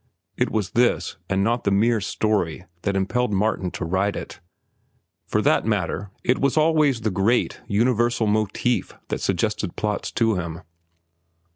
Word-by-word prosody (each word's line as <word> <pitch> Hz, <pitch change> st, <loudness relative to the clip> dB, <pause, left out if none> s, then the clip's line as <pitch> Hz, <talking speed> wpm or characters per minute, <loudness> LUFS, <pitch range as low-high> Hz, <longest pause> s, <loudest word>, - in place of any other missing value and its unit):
It -, -, +1 dB
was 105 Hz, -4 st, -1 dB
this, 120 Hz, +2 st, +1 dB
and 95 Hz, 0 st, +1 dB
not 120 Hz, +3 st, +1 dB
the -, -, +2 dB
mere 110 Hz, +3 st, +3 dB
story, 90 Hz, -5 st, -1 dB, 0.2 s
that 100 Hz, +1 st, -1 dB
impelled 115 Hz, +5 st, 0 dB
Martin 95 Hz, -2 st, 0 dB
to 90 Hz, -, -5 dB
write 95 Hz, +4 st, 0 dB
it. -, -, -7 dB, 0.9 s
For -, -, 0 dB
that -, -, +3 dB
matter, 100 Hz, +4 st, -1 dB
it 125 Hz, -, +2 dB
was 140 Hz, +2 st, +1 dB
always 155 Hz, -5 st, +3 dB
the 110 Hz, -1 st, 0 dB
great, 100 Hz, +6 st, +1 dB
universal 120 Hz, +1 st, +2 dB
motif 110 Hz, +3 st, 0 dB, 0.2 s
that -, -, -2 dB
suggested -, -, -1 dB
plots 105 Hz, -1 st, -2 dB
to 115 Hz, -4 st, +2 dB
him. 85 Hz, -2 st, -5 dB
105 Hz, 150 wpm, -23 LUFS, 95-120 Hz, 0.9 s, mere